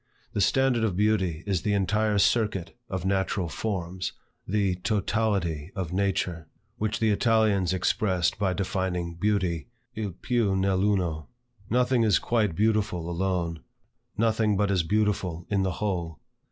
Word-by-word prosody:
The 100 - 0
standard 130 0 +3
of 105 -5 0
beauty 95 -5 +1
is 95 -4 0
the 105 +1 +1
entire 105 +2 +1
circuit 100 -3 +1
of 95 -1 -3
natural 95 -1 0
forms, 95 0 -3 0.3
the 95 -2 +1
totality 100 -5 -1
of 90 -3 -3
nature; 90 -4 -1 0.3
which 110 0 -1
the 110 -1 +3
Italians 105 -4 +2
expressed 95 -1 +1
by 95 -3 +1
defining 90 -3 -2
beauty 90 -3 0 0.3
"il 105 -5 -4
piu 110 0 0
nell' 95 0 +1
uno." 80 -6 -2 0.4
Nothing 125 +1 +2
is 110 -3 +4
quite 110 -7 0
beautiful 105 -4 +1
alone: 85 -2 -1 0.6
nothing 110 -2 +2
but 105 0 +1
is 95 -3 +3
beautiful 95 -2 0
in 100 -1 +2
the 95 -1 0
whole. 85 -5 -2
95 Hz, 140 wpm, -27 LUFS, 90-105 Hz, 0.6 s, is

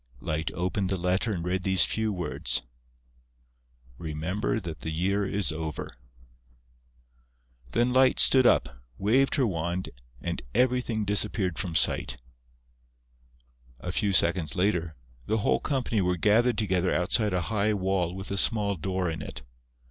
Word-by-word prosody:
Light 80 +1 -2
opened 95 +2 -1
the 95 - 0
letter 90 +6 0
and 85 -4 -3
read 90 +1 -1
these 95 -2 +4
few 110 -1 -1
words: 90 -9 -2 1.4
"Remember 80 +7 -2
that 85 -6 -7
the - - -5
year 95 +5 0
is 100 -2 +1
over." 80 -1 -5 1.9
Then 120 +1 +2
Light 130 0 +4
stood 130 -2 +6
up, - - +1 0.2
waved 130 +7 +2
her 135 -3 +2
wand 85 -2 -2 0.3
and - - -4
everything 125 -4 +1
disappeared 100 -3 +1
from 90 -3 -3
sight. 75 - +1 1.6
A 90 - -4
few 100 +1 +1
seconds 85 -4 +2
later, 90 -4 0 0.3
the 110 - +1
whole 65 -11 +1
company 125 -6 -1
were 90 -1 0
gathered 110 +5 +3
together 95 -4 +1
outside 105 +4 +1
a 90 - +1
high 105 0 +1
wall 95 -2 -1
with 95 +1 -6
a 100 - -2
small 100 -1 +2
door 95 +3 -2
in 80 -1 -4
it. 75 - -7
95 Hz, 140 wpm, -27 LUFS, 85-105 Hz, 1.9 s, stood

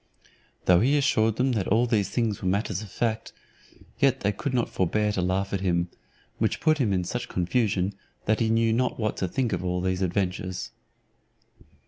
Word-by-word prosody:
Though 90 -1 +6
he 135 +8 +3
assured 115 -6 +2
them 130 +3 +1
that 105 -6 -1
all 115 +4 +3
these 110 -5 +1
things 115 -5 -1
were 95 - -2
matters 100 0 0
of 105 - -9
fact, 115 0 -2 0.7
yet 135 -1 +3
they 105 - +2
could 115 +7 -4
not 125 -2 +1
forbear 105 +3 0
to 100 - -1
laugh 95 +2 -1
at 95 - -1
him: 85 -2 +1 0.5
which - - 0
put 155 -1 +2
him 115 -7 +2
into 90 -2 0
such - - -4
confusion, 95 0 0 0.3
that 110 +1 +2
he 115 - +1
knew 115 0 +3
not 125 +1 0
what 110 -2 0
to 95 - -1
think 120 +6 -1
of - - -2
all 90 0 -1
those 95 0 -1
adventures. 90 0 -2
105 Hz, 190 wpm, -26 LUFS, 95-115 Hz, 0.7 s, Though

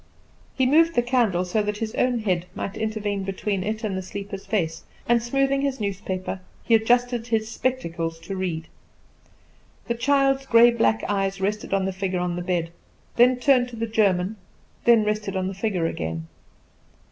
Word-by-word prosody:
He 260 - +2
moved 325 +5 +4
the 240 - +3
candle 235 -8 +1
so 195 +4 0
that 210 0 -2
his 220 0 -4
own 245 -2 +1
head 180 -4 0
might 200 - -4
intervene 215 -2 -2
between 195 0 -2
it 215 +3 -3
and 205 -3 -1
the 190 - -2
sleeper's 195 +1 -7
face; 180 -6 -1 0.2
and, 235 0 +4
smoothing 275 +3 +1
his 275 -2 -1
newspaper, 190 -2 -3 0.2
he 230 - +1
adjusted 240 +1 +2
his 225 -1 0
spectacles 170 -11 -2
to 195 - -6
read. 170 -4 -3 1.2
The 235 - +1
child's 270 +2 +2
grey 235 -1 +7
black 225 -1 +1
eyes 195 -1 -1
rested 205 +2 -2
on 195 -1 +1
the 190 - -2
figure 190 -1 -2
on 175 -1 -1
the 175 - -3
bed, 175 -2 -1 0.5
then 250 +1 +6
turned 250 -1 +3
to 240 - -9
the 230 0 -2
German, 205 -2 +1 0.5
then 235 -2 +6
rested 210 -2 -2
on 185 0 -1
the 190 - -3
figure 195 -3 -1
again. 80 - -3
210 Hz, 175 wpm, -24 LUFS, 190-240 Hz, 1.2 s, grey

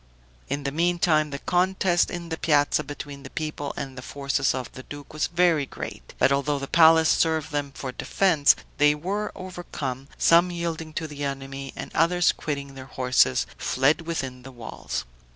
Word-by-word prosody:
In 145 - -3
the 140 - -2
meantime, 165 -1 +2
the 140 - -4
contest 180 +2 +2
in 170 -1 -6
the 160 - -3
piazza 150 -1 +3
between 145 -1 -8
the 130 - -9
people 155 -2 -4
and 135 -1 -5
the 125 - -7
forces 140 +1 -1
of 130 -2 -5
the 130 - -9
duke 145 +2 -10
was 155 - 0
very 170 -4 +2
great; - - -8
but - - +4
although 140 +1 +1
the 140 - -4
place 160 0 +6
served 160 -1 +2
them 145 -2 -2
for 130 - -5
defense, 155 +2 +3 0.2
they 150 0 +5
were 195 +7 -3
overcome, 160 -8 -6
some 170 +2 +5
yielding 165 -2 -4
to 160 +1 -3
the 145 -1 -7
enemy, 135 0 -5
and - - -7
others, 175 +2 +3
quitting 140 -2 -5
their 130 -1 -9
horses, 125 - +2
fled 140 +6 +2
within 135 -6 -4
the 135 +2 -11
walls. 120 -3 -6
150 Hz, 175 wpm, -25 LUFS, 140-165 Hz, 0.2 s, place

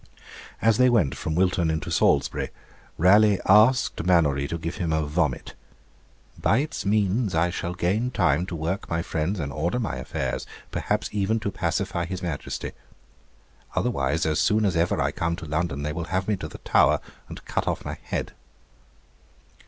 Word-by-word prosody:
As 110 0 +4
they 125 0 +6
went 100 - +3
from 80 +3 -3
Wilton 90 -2 +2
into 80 -1 -2
Salisbury, - - +2 0.5
Raleigh 100 +3 +5
asked 110 +1 +4
Mannourie 75 -6 +3
to 85 - -3
give 85 +1 -5
him 85 -2 -1
a 80 -1 +1
vomit; 75 -2 -1 0.9
'by 110 - +3
its 135 -7 -2
means 105 0 +1
I 85 +2 +2
shall 85 +1 -4
gain 100 +8 0
time 85 - +1
to 90 - -5
work 85 +5 -3
my 85 0 -1
friends, 85 +6 -2
and 70 -3 -4
order 85 +9 -1
my 115 - -2
affairs; - - -3 0.2
perhaps - - -1
even 105 +2 0
to 100 - -2
pacify 85 -1 -1
his 95 +1 -5
Majesty. 80 -5 -4 1.0
Otherwise, 80 - 0
as 80 -1 +1
soon 110 0 +3
as 95 -3 +1
ever 85 +1 +1
I - - +1
come 85 0 -1
to 85 - -8
London, 75 -2 -2
they 75 +1 -2
will 85 0 -4
have 95 +1 -2
me 105 - +2
to - - -5
the - - -10
Tower, - - +3 0.3
and - - -10
cut - - -2
off - - -2
my - - -5
head.' - - -4
90 Hz, 175 wpm, -25 LUFS, 80-105 Hz, 1.0 s, they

